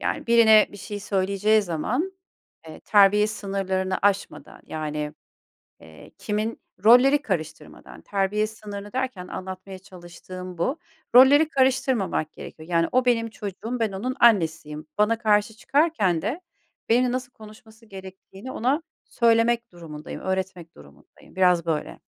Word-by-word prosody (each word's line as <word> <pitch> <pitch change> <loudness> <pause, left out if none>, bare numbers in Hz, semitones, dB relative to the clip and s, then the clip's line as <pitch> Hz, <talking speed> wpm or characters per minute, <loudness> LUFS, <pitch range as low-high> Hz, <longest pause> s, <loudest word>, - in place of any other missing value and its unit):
Yani - - -3
birine 225 -2 +6
bir 205 - -10
şey 205 +1 -7
söyleyeceği 200 +2 +1
zaman, 225 - -2 0.6
eee, 155 - -11
terbiye 210 0 +4
sınırlarını 195 -3 -2
aşmadan 200 -1 -1
yani, 150 -1 -4 0.7
eee, 80 -2 -15
kimin 215 +2 -3 0.2
rolleri 265 +5 +6
karıştırmadan, 170 - -6
terbiye 205 +2 -1
sınırını 205 -2 -9
derken 250 -8 -4
anlatmaya 185 +1 -8
çalıştığım 180 0 -11
bu, 260 - -1 0.4
rolleri 285 +5 +7
karıştırmamak 260 - 0
gerekiyor. 160 +1 -11
Yani 165 -1 +1
o 255 0 +3
benim 230 -2 +1
çocuğum, 220 +4 -6
ben 220 -3 0
onun 250 +7 -4
annesiyim. 160 -9 +2
Bana 225 +2 +2
karşı 210 -1 +1
çıkarken 245 - +1
de 255 - -3 0.5
benimle 245 +2 +3
nasıl 250 -1 -4
konuşması 220 +1 -16
gerektiğini 190 +4 -11
ona 270 +7 0 0.2
söylemek 235 -1 +1
durumundayım, 155 -3 -9
öğretmek 190 -3 -4
durumundayım. 70 - -19
Biraz 180 -3 +3
böyle. 160 -2 -3
205 Hz, 125 wpm, -24 LUFS, 185-235 Hz, 0.7 s, rolleri